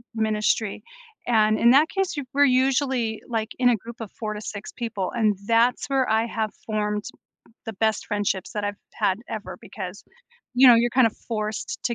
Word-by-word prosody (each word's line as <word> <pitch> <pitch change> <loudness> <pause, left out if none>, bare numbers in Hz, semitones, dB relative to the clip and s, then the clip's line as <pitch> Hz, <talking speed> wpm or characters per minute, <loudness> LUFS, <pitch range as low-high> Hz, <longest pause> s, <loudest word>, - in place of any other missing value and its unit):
ministry, 215 -1 0 0.5
and 215 -2 +3
in 235 - +6
that 295 +5 +5
case, 385 -2 -1
y 290 - -3
we're 285 0 +6
usually 260 -3 +1
like 225 -2 -2
in 250 -1 +4
a 240 - +4
group 230 +3 -9
of 225 -4 -7
4 215 -2 -5
to 210 - -6
6 205 -1 -7
people, 225 -6 -4
and 215 -3 +2
that's 230 +2 +3
where 265 -2 +2
I 220 +1 +2
have 220 -2 -2 0.2
formed 210 -1 -1 0.6
the 225 - -5
best 220 +2 0
friendships 205 -3 -1
that 210 -1 -2
I've 205 0 -2 0.2
had 190 0 +1
ever 195 -5 -6
because, 190 -1 -8 0.5
you 260 +2 +7
know, 245 - +10
you're 235 +1 +3
kinda 250 -3 +4 0.2
forced 215 -2 -3
t 235 - 0
225 Hz, 185 wpm, -24 LUFS, 210-245 Hz, 0.6 s, know